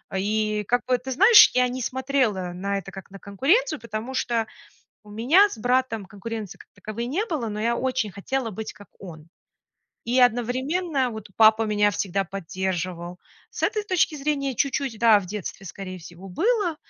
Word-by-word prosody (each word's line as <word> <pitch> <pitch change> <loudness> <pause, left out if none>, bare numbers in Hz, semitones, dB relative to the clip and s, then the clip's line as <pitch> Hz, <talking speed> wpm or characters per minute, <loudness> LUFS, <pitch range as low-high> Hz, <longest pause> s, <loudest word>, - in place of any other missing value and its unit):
И 210 +2 0
как 245 0 +1
бы, 255 0 +2
ты 265 +2 -7
знаешь, 405 - +8
я 250 0 +4
не 255 +1 -5
смотрела 255 -8 -1
на 200 +3 -2
это 195 0 -7
как 195 -1 -10
на 195 - -11
конкуренцию, 310 - +1
потому 230 +2 -6
что 235 -3 0 0.6
у 210 - -16
меня 260 - +4
с - - -8
братом 245 -2 0
конкуренции 205 +1 -7
как - - -16
таковой 215 +2 -6
не 305 - -1
было, 300 - -3
но 210 0 -4
я 235 +2 +1
очень 255 -5 -1
хотела 230 +5 -3
быть 220 +2 -6
как 205 - -16
он. 165 -4 -11 0.8
И 245 +2 +2
одновременно 255 +5 +1
вот 220 -2 -8
папа 220 0 +6
меня 210 -1 +2
всегда 195 0 -1
поддерживал. 180 -1 -4 0.3
С - - -8
этой 425 - 0
точки 370 -6 +1
зрения 275 -2 -1
чуть-чуть, 270 -2 -1
да, 225 -3 +6
в 195 - -7
детстве, 195 0 -6
скорее 185 0 -7
всего, 175 +3 -12
было, 380 - 0
225 Hz, 175 wpm, -24 LUFS, 200-265 Hz, 0.8 s, знаешь